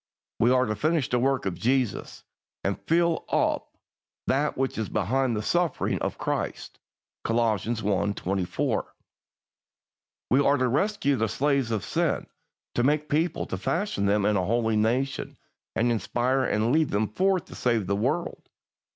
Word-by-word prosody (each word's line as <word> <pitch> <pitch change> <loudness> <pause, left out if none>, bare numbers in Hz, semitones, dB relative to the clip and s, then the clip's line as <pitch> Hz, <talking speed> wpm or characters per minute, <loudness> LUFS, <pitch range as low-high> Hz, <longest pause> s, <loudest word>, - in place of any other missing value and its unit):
We 120 - +4
are 130 0 +4
to 110 -2 -2
finish 155 +1 +1
the 125 - +2
work 135 -1 +1
of 95 - 0
Jesus, 125 +2 -1 0.4
and - - -1
"fill 170 0 +2
up - - 0 0.5
that 145 +3 +1
which 130 -3 -1
is 110 - -2
behind 120 +4 0
of 105 - -2
the - - -5
sufferings 175 -5 0
of - - -2
Christ" - - -3 0.4
(Col. 115 +1 +1
i. 115 -2 +3 0.6
24). 95 -1 -2 1.4
We 135 +3 +5
are 140 +1 +4
to 130 -1 +2
rescue 145 - +1
the 110 -1 0
slaves 140 -2 +1
of 110 -4 -2
sin, - - 0 0.5
to - - +1
make 150 +4 +2
a 150 - -6
people, 165 +3 +1
to 95 - -5
fashion 165 - -1
them 100 0 +2
into 105 -2 +2
a - - -2
holy 115 +1 +1
nation, 125 +5 0 0.4
and 120 +1 +2
inspire 125 +3 0
and 110 +1 +1
lead 155 0 +3
them 105 +2 +1
forth 185 - +1
to - - -12
save 115 -5 +1
the 100 +2 0
world. 130 +11 -2
125 Hz, 165 wpm, -26 LUFS, 110-145 Hz, 1.4 s, We